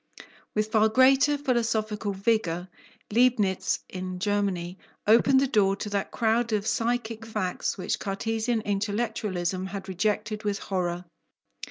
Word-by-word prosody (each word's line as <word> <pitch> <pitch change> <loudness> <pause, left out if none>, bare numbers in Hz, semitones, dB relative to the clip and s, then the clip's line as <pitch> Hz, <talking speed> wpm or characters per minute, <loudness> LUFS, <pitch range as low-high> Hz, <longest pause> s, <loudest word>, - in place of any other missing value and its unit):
With 215 0 0
far 220 0 +4
greater 270 +5 +5
philosophical 225 -6 -1
vigour, 190 -4 0 0.4
Leibnitz 225 -6 +2
in 185 -1 -5
Germany 195 -2 -1 0.3
opened 240 +5 +5
the 275 - +3
door 200 -5 +3
to 210 +1 -6
that 200 -1 -1
crowd 230 +1 +1
of 210 -1 0
psychic 230 -1 -1
facts 215 -5 -2
which 185 - -2
Cartesian 225 +3 -1
intellectualism 200 -3 -2
had 195 0 -6
rejected 210 +3 -1
with 205 -1 -1
horror. 180 -3 -3
210 Hz, 125 wpm, -27 LUFS, 195-225 Hz, 0.4 s, greater